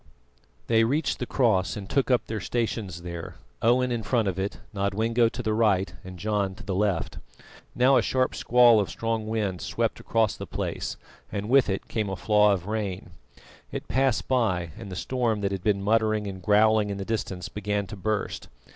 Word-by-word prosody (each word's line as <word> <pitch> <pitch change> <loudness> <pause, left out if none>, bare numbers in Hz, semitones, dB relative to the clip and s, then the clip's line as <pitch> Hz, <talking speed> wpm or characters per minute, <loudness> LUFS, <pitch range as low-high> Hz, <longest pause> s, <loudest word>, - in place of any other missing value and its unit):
They 115 - +4
reached 140 +7 0
the 125 - -3
cross 95 -9 +1
and 100 -2 -6
took 135 +4 +1
up 125 -2 +3
their 110 -1 -4
stations 105 -5 -3
there, 85 -1 -6 0.3
Owen 125 +2 +3
in 120 -1 -1
front 115 -1 +1
of 95 -1 -2
it, 100 +1 -2 0.2
Nodwengo 110 +4 +1
to - - -6
the 110 - 0
right, 105 -4 +2
and 90 0 -9
John 100 0 -1
to - - -11
the 100 - -3
left. 95 -2 -1 0.6
Now 130 +2 +5
a - - +4
sharp 130 -1 +1
squall 120 -2 +5
of 100 - -1
strong 115 -1 -2
wind 105 -5 -2
swept - - -1
across 115 -3 +1
the - - -7
space, - - -3 0.3
and 105 +1 -3
with 135 -3 +5
it 95 - -2
came 110 -3 -2
a 95 - -2
flaw 105 +3 +4
of 95 -3 -1
rain. 100 -4 -3 0.6
It - - -5
passed 130 -2 +1
by, 95 -10 +1
and 100 - -9
the - - -5
storm 115 +1 -1
that 100 -1 0
had 95 -2 -4
been 100 -2 +1
muttering 110 0 +2
and 95 -2 -6
growling 105 +1 +4
in 100 - -3
the 100 - -5
distance 95 -4 -3
began 105 -1 -2
to 95 - -8
burst. 105 +2 -2
105 Hz, 195 wpm, -26 LUFS, 95-115 Hz, 0.6 s, Now